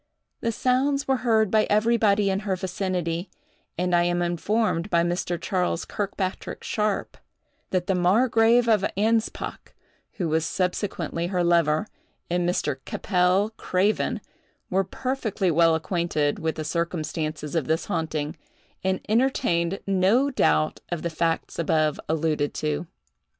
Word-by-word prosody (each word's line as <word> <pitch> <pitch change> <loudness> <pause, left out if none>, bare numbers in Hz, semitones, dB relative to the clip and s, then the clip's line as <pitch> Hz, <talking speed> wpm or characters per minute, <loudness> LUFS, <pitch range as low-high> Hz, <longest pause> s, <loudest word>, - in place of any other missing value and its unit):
The 230 - -1
sounds 265 +4 +1
were 265 -1 +2
heard 220 -4 +2
by 215 -1 +4
everybody 210 -2 +3
in 190 - 0
her 200 -2 -1
vicinity; 180 -2 -2 0.5
and 180 +1 0
I 175 - +4
am 175 0 +1
informed 175 +2 0
by 170 -2 +3
Mr. 175 0 -1
Charles 180 -1 -1
Kirkpatrick 195 -2 -4
Sharpe, 210 -2 -1 0.5
that 185 -2 0
the 195 - +1
margrave 225 +5 +4
of 215 -4 +3
Anspach, 225 +2 -1 0.4
who 180 - -2
was 160 0 +1
subsequently 180 -2 -2
her 180 -1 0
lover, 170 0 +3 0.5
and 175 0 +1
Mr. 180 - -1
Keppel 185 +2 +1
Craven, 195 +4 0 0.5
were 190 +1 +3
perfectly 220 -4 -1
well 165 0 +4
acquainted 160 -3 -1
with 160 0 -1
the 155 - -4
circumstances 155 -2 -3
of 165 -5 0
this 160 +1 0
haunting, 155 -1 -2 0.5
and 190 0 0
entertained 195 -7 +1
no 195 +9 +3
doubt 75 - +2
of 175 -3 -3
the 170 - -2
facts 165 +1 -1
above 155 -2 +1
alluded 155 -2 0
to. 155 +2 -2
180 Hz, 135 wpm, -25 LUFS, 165-210 Hz, 0.5 s, by